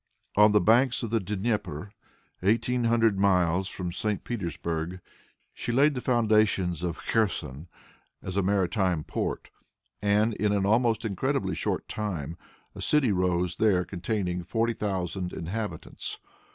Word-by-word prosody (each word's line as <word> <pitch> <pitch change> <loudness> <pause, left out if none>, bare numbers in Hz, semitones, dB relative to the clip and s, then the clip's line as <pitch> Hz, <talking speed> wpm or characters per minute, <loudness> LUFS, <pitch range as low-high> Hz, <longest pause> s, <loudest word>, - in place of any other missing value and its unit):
On 105 +1 +7
the 105 - +5
banks 120 +6 +3
of 115 - -3
the 115 - +2
Dnieper, 100 -3 -2 0.5
eighteen 115 +5 +1
hundred 115 -3 +3
miles 95 -2 +3
from 90 -2 -4
St. 105 +3 -2
Petersburg, 85 - -3 0.5
she - - -4
laid 140 +5 +4
the 125 - -4
foundations 110 - +2
of 85 -2 -2
Kherson 90 - -1 0.5
as 95 - -6
a 100 - +3
maritime 95 -3 +1
port, - - -3 0.5
and 105 +2 +2
in 105 -1 0
an 100 -1 +1
almost 115 +1 +2
incredibly 100 -4 -1
short - - -2
time 85 -8 -4 0.4
a - - -9
city 150 -7 +3
rose 90 -1 0
there 95 -5 +3
containing 90 -1 -2
forty 115 +5 0
thousand 95 -4 -3
inhabitants. 105 +6 -5
100 Hz, 135 wpm, -27 LUFS, 90-110 Hz, 0.5 s, On